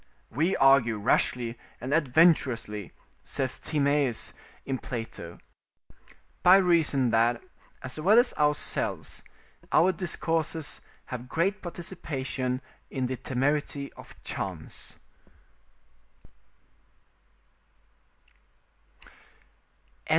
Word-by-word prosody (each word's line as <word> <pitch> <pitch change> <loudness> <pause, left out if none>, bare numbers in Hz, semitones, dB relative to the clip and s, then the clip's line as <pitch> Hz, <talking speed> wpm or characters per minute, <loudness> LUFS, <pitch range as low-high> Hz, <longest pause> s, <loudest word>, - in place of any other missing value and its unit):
"We 165 +6 +1
argue 135 -5 +5
rashly 120 +2 +1 0.2
and 130 +3 -3
adventurously," 130 - +2 0.3
says 130 -2 -2
Timaeus 140 -4 0 0.3
in 135 -2 -2
Plato, 115 -8 -6 1.0
"by 185 +2 +8
reason 160 -9 +3
that, 115 +1 +3 0.4
as 130 +3 -6
well 195 +8 +5
as 245 +1 +5
ourselves, 150 0 -1 0.5
our 185 +3 +5
discourses 165 -3 -1 0.3
have 125 0 -6
great 195 +8 0
participation 140 -7 -4 0.3
in 130 -1 -2
the 130 +1 -2
temerity 140 +3 -1
of - - -13
chance." - - -6
140 Hz, 75 wpm, -28 LUFS, 125-165 Hz, 1.0 s, by